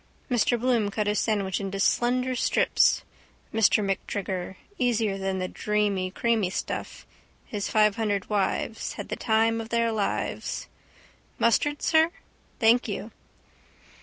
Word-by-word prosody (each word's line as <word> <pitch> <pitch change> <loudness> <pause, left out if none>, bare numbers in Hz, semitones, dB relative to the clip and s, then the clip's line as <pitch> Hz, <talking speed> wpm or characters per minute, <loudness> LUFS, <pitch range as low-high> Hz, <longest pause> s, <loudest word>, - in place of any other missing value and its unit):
Mr 240 0 +2
Bloom 235 -4 +1
cut 210 +1 -2
his 210 0 +1
sandwich 200 -4 0
into 195 0 -4
slender 250 +5 +2
strips. - - +3 0.5
Mr 220 -1 +3
MacTrigger. 190 -1 -3 0.2
Easier 225 -5 +1
than 190 0 -1
the 185 0 -2
dreamy 205 -2 0
creamy 220 -1 +1
stuff. 190 - -5 0.4
His 205 -2 -4
five 215 -2 +3
hundred 205 -3 -1
wives. 210 +2 -1
Had - - -7
the - - -2
time 225 0 +1
of 225 - -8
their 230 -1 +1
lives. 210 -2 -2 0.7
—Mustard, 290 +6 +2
sir? 320 0 +4 0.5
—Thank 235 +1 +4
you. 210 +1 -5
215 Hz, 130 wpm, -26 LUFS, 200-230 Hz, 0.7 s, sir